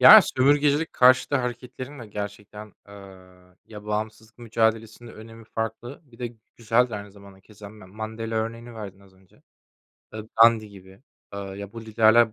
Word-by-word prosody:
Ya, - - +11
sömürgecilik 145 +3 +2
karşıtı 130 +3 +5
hareketlerin 125 +2 -5
de 115 - -9
gerçekten, 105 0 -8
aaa, 95 -2 -15
ya, 105 -1 -11
bağımsızlık 110 +1 -4
mücadelesinin 115 0 -1
önemi 115 +1 -12
farklı. 115 +5 -5
Bir 120 -5 -20
de 120 -1 -5 0.2
güzel 115 +2 +2
de - - -5
aynı 100 0 -9
zamanda 100 -1 -16
keza 105 +1 -13
Ma 105 -2 -14
Mandela 110 +3 -5
örneğini 115 +2 -4
verdin 100 -3 -9
az 95 -1 -21
önce. 95 -1 -26 0.7
Eee, 110 - -5 0.2
Gandhi 115 -2 +5
gibi. 95 +2 -16 0.3
Eee, - - -5
ya, 100 0 -8
bu 115 - -8
liderler 110 +1 +4
110 Hz, 155 wpm, -25 LUFS, 100-115 Hz, 0.7 s, Ya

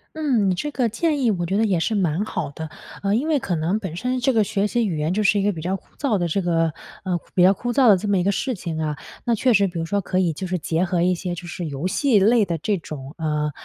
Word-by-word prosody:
嗯， 240 -12 +1
这 295 +11 -3
个 245 -4 0
建 290 +5 0
议 240 - +3
我 175 -4 -1
觉 190 +4 0
得 220 - +3
也 190 -5 +1
是 165 - 0
蛮 185 -2 +1
好 - - -3
的。 160 +2 -7 0.3
呃， 200 0 +1
因 265 +7 0
为 310 -2 +3
可 185 -7 -2
能 165 +6 0
本 185 -6 -6
身 250 +7 -1
这 255 +1 +2
个 220 - +4
学 205 -1 0
习 230 +2 +1
语 165 -5 -2
言， 155 +3 0
就 215 - +1
是 205 0 +3
一 - - 0
个 205 - +2
比 165 -5 -6
较 185 +3 -1
枯 195 - -13
燥 265 -8 +1
的 175 -2 0
这 180 +4 0
个 165 -3 +1 0.6
比 180 - +5
较 190 +2 +7
枯 240 +5 -3
燥 260 -1 +4
的 195 - +7
这 210 - -4
么 200 -1 +2
一 180 - +1
个 200 - +2
事 255 +5 -2
情 170 -4 -5
啊。 150 -2 -2 0.3
那 235 -2 +2
确 250 +3 +2
实 200 -2 +4
比 175 -2 -6
如 165 - -2
说 200 +4 0
可 185 0 -2
以 175 -4 +2
就 185 +4 -5
是 180 - -1
结 165 +1 -1
合 175 -1 0
一 180 +1 +3
些 175 0 -4
就 175 +1 -8
是 175 +1 -5
游 145 +3 -5
戏 240 +2 +3
类 220 +2 +4
的 170 -2 -2
这 205 +4 0
种， 145 -4 -8
呃 150 -2 -1
190 Hz, 315 characters per minute, -22 LUFS, 170-220 Hz, 0.6 s, 较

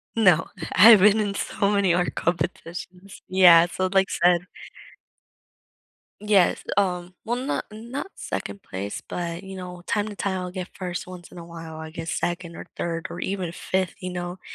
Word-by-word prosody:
No. 180 -7 +4 0.3
I've 215 +1 +9
been 210 +2 +5
in 200 -1 -1
so 200 -1 0
many 200 -4 +3
art 175 0 0
competitions. 180 +2 -4
Yeah, 175 -2 +7
so, 185 0 -1
like, 195 -1 +3
said 175 +1 +2 1.7
Yes, 205 -4 +3
um 180 -2 0
well, 235 +2 0
not 260 +3 -2
not 235 - -6
2nd 200 - -5
place, 100 +2 -5
but, 170 +1 -4
you 190 0 -8
know, 180 -1 -8
time 210 0 0
to 210 - -7
time 190 -2 -2
will 180 - -5
get 185 -1 -5
1st 180 -2 -4
once 180 -1 -11
in - - -12
a 170 - -8
while, 165 -1 -9
I 160 0 -7
get 165 0 -7
2nd 175 -1 -2
or - - -8
3rd 165 -1 -3
or - - -6
even 190 -3 -3
5th, 185 +1 -2
you 180 - -4
know? 175 +1 -5
180 Hz, 175 wpm, -24 LUFS, 175-200 Hz, 1.7 s, I've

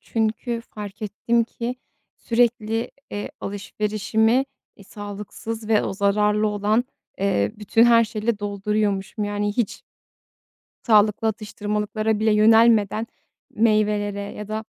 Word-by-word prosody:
çünkü 230 +1 -2
fark 210 -2 -9
ettim 230 +3 0
ki, 235 +2 -5 0.4
sürekli, 230 -1 0 0.2
eee, 205 - -5
alışverişimi, 215 +4 0 0.3
iii, 200 - -15
sağlıksız 210 +2 -7
ve 220 -2 +3
o - - -2
zararlı 210 +2 +2
olan, 210 +3 +1 0.4
ııı, 200 +1 +1
bütün 215 +2 +3
her 230 -1 +6
şeyle 215 0 -2
dolduruyormuşum. 205 0 -1
Yani, 205 0 -1
hiç 235 -5 -1 1.1
sağlıklı 215 0 +4
atıştırmalıklara 210 0 -2
bile 220 0 +3
yönelmeden 220 0 +4 0.4
meyvelere 210 -2 +1
ya 200 +1 -6
da 215 +1 -3
215 Hz, 110 wpm, -23 LUFS, 205-225 Hz, 1.1 s, her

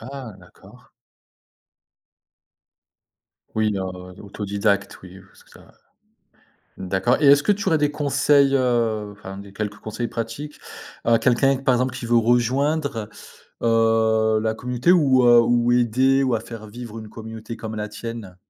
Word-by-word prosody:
Ah 130 -2 -8
d'accord! 90 -1 -19 2.7
Oui, 110 -1 +1
heu, - - -3 0.4
autodidacte, 100 0 -2
oui, 90 0 -12
je - - -13
vois 95 - -22
ce - - -21
que - - -25
c'est - - -15
ouais. - - -17 1.1
D'accord 95 +9 0
et 145 - +4
est-ce 140 +1 +6
que 210 - +3
tu 205 0 -2
aurais 160 - +3
des 150 -1 +1
conseils, 140 -1 +2
heu, 115 -5 0
enfin 95 -1 -10
des 100 0 -11
quelques 105 0 -4
conseils 110 +3 -5
pratiques 115 +7 -6 0.5
à 115 -1 +4
quelqu'un, 135 +2 +3
par 135 -1 +1
exemple, 125 0 -1
qui 130 -2 -6
veut 120 0 +3
rejoindre, 125 +1 0 0.5
heu, 110 -1 +2
la 110 - 0
communauté 125 +8 +1
ou, 135 -7 +4
heu, 120 -1 +7
ou 120 +1 +2
aider 130 +3 +2
ou 130 -3 +1
à 110 - -1
faire 115 -1 -10
vivre 115 +1 -9
une 110 -1 -9
communauté 110 +1 -9
comme 110 -1 -7
la 105 0 -4
tienne? 110 -4 -8
115 Hz, 160 wpm, -22 LUFS, 110-130 Hz, 2.7 s, heu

